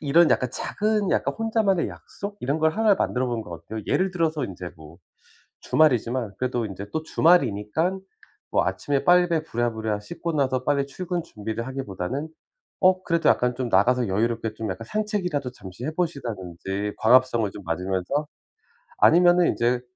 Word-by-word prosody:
이런 155 +3 +4
약간 125 -2 +2
작은 210 -2 -1
약간 - - 0
혼자만의 220 -5 +1
약속? 205 +1 -8
이런 140 +5 -1
걸 160 0 +3
1 215 +1 +4
만들어 130 -8 0
보는 120 -2 -2
거 90 - -12
어때요? 85 +7 -7
예를 190 +1 +1
들어서 160 -5 0
인제 90 -4 -7
뭐 80 +2 -14 0.6
주말이지만 125 -7 +2
그래도 125 -2 -1
인제 100 0 -7
또 160 - -1
주말이니깐 160 - +2 0.5
뭐 - - +2
아침에 140 -1 -1
빨리 175 -2 +4
부랴부랴 110 -6 -2
씻고 170 +7 -5
나서 130 -3 0
빨리 140 0 +1
출근 175 +3 -4
준비를 110 -4 -5
하기보다는 130 - -4 0.5
어, 185 0 +4
그래도 170 -1 +2
약간 125 0 +2
좀 125 -1 -3
나가서 120 +5 +3
여유롭게 115 +3 -1
좀 110 -1 -4
약간 105 +5 -7
산책이라도 190 - -2
잠시 100 0 -9
해 155 - -2
보신다든지, 105 - -3
광합성을 120 -2 +4
좀 100 - -9
맞으면서. 95 - -1 0.7
아니면은 175 +1 +6
인제 120 +1 +1
130 Hz, 365 characters per minute, -24 LUFS, 110-170 Hz, 0.7 s, 아니면은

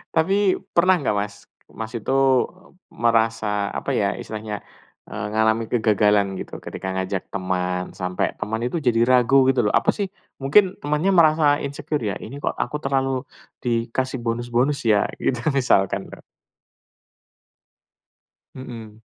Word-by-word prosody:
Tapi, 195 +4 +3 0.2
pernah 185 +2 +5
nggak 130 -9 -1
Mas, 100 0 -2 0.4
Mas 110 0 -7
itu 115 +4 -2 0.8
merasa, 110 -3 +1
apa - - -3
ya, - - 0
istilahnya, 110 -1 -6 0.5
eee, 100 0 -5
ngalamin 110 +1 +1
kegagalan 105 -3 +3
gitu, - - -8
ketika 95 - -5
ngajak 95 0 -3
teman, 90 -1 -2
sampai 90 -1 -2
teman 110 +1 -2
itu 145 - -2
jadi 120 -3 +2
ragu 130 +1 +4
gitu 130 -2 +3
lho, - - -1
"Apa - - +3
sih," 200 -3 -3 0.3
mungkin 185 +8 +4
temannya 150 +6 +1
merasa 160 -3 +5 0.2
insecure 140 0 -3
ya, - - -4
"ini 140 +6 -8
kok - - -1
aku - - -2
terlalu 135 -1 0 0.4
dikasih 120 +2 -1
bonus-bonus, 120 +4 0
ya?" 105 -1 +4 0.2
Gitu, 125 - 0
misalkan 120 -8 +1
lho. - - -11 2.3
Mhm. 115 -4 -9
115 Hz, 130 wpm, -22 LUFS, 105-135 Hz, 2.3 s, pernah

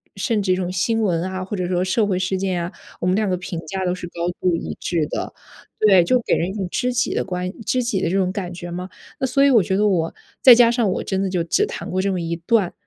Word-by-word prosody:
甚 225 -5 0
至 190 -2 0
一 - - +2
种 180 -1 -2
新 225 +5 0
闻 175 -6 +1
啊， 185 0 -4
或 195 - -5
者 180 -1 -2
说 180 0 0
社 190 +4 +1
会 190 -3 0
事 185 +1 -1
件 185 -2 -1
啊， 170 - -5 0.3
我 - - 0
们 185 - +3
两 215 0 +1
个 180 - 0
评 180 -1 -5
价 190 +4 -3
都 180 - +1
是 180 -1 -7
高 170 0 -3
度 180 -2 +2
一 - - -5
致 165 -4 -1
的。 - - -4 0.5
对， 195 -4 +7
就 250 +9 +3
给 - - 0
人 170 - 0
一 - - -5
种 200 -2 -3
知 250 -1 0
己 245 - 0
的 - - -1
关 180 -1 -3
知 250 +3 0
己 220 -5 0
的 170 - 0
这 185 - -1
种 185 -1 +1
感 185 -3 -5
觉 175 0 -7
嘛。 180 +2 -5 0.3
那 265 - 0
所 275 +2 +3
以 280 - +6
我 235 -5 +6
觉 190 +1 -1
得 210 +2 +2
我 165 -4 0 0.3
再 250 -2 +10
加 235 -1 +6
上 235 -4 +1
我 - - -2
真 190 -1 -1
的 195 - 0
就 180 -2 0
只 395 - +2
谈 470 +2 -6
过 185 - 0
这 200 - 0
么 185 -2 -2
一 165 0 -3
段， 185 +1 +1
185 Hz, 315 characters per minute, -21 LUFS, 180-210 Hz, 0.5 s, 再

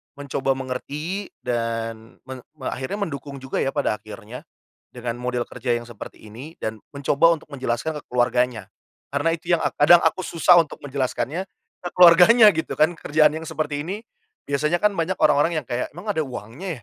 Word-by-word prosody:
mencoba 140 -1 -1
mengerti 145 +9 -5 0.2
dan 115 -1 -3
meng 130 -1 -7 0.2
me 135 -4 -7
akhirnya 195 +11 -3
mendukung 140 -2 -7
juga 130 0 -4
ya 135 - 0
pada - - +1
akhirnya 110 +3 -10 0.5
dengan 120 -1 -5
model 125 0 -2
kerja 125 0 -2
yang 120 - -5
seperti 110 -1 -11
ini 130 +10 -10
dan 110 0 -3 0.2
mencoba 140 +4 +3
untuk - - -20
menjelaskan 135 +3 -2
ke - - -11
keluarganya. 125 -3 0 0.4
Karena 145 +4 +1
itu 170 +1 -8
yang 170 - +2
ak 145 -3 -1
kadang 170 +4 +7
aku - - +2
susah 175 +1 +5
untuk 150 - -11
menjelaskannya, 140 +5 -2 0.4
ke - - -1
keluarganya 180 +6 +8
gitu 160 - -3
kan 155 +3 +3
kerjaan 155 0 +3
yang 160 +1 -6
seperti 150 -2 -3
ini 200 +6 -5 0.5
biasanya 150 +4 +1
kan 210 0 +4
banyak 180 +1 -1
orang-orang 155 +2 +3
yang 145 - -6
kayak, 120 +1 -2
"Emang 175 +6 -10
ada 160 -6 0
uangnya 130 - -7
140 Hz, 175 wpm, -23 LUFS, 125-165 Hz, 0.5 s, keluarganya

